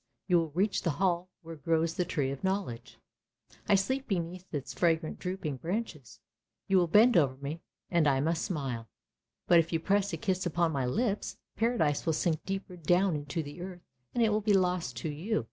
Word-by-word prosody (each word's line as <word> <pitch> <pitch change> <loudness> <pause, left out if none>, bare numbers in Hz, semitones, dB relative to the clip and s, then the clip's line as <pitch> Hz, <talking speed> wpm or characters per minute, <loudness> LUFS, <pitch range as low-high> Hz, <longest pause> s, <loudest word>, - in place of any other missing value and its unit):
You 180 -3 +5
will 165 -1 -1
reach 195 +3 +1
the 170 - 0
hall 180 -1 +1
where 165 0 -8
grows 165 +2 +1
the 180 - -1
Tree 145 -6 -1
of 135 - -7
Knowledge; 185 -12 -2 0.7
I 205 - +7
sleep 260 +8 0
beneath 180 -1 -3
its 145 -4 -4
fragrant 165 -2 +1
drooping 180 -6 -3
branches. 170 - -4 0.5
You 195 -1 +4
will 175 - +2
bend 220 +8 +6
over 140 -6 +4
me 145 +4 -5 0.3
and 170 -4 +3
I 135 -2 +3
must 160 +3 0
smile, 130 - -3 0.6
but 170 - +6
if 165 0 0
you 165 - +1
press 200 +3 +1
a - - -3
kiss 185 -1 -1
upon 170 0 +1
my 135 -4 -1
lips, 210 - -1 0.2
Paradise 220 -12 +1
will 160 - +3
sink 160 0 0
deep 195 0 -2 0.2
down 180 +2 +3
into 145 +2 -3
the 145 +4 -9
earth, 180 -1 -8 0.3
and 235 - +3
it 225 - +4
will 210 0 +1
be 210 0 +2
lost 180 -10 +1
to 140 +7 -3
you. 165 +10 -1
170 Hz, 195 wpm, -30 LUFS, 150-195 Hz, 0.7 s, I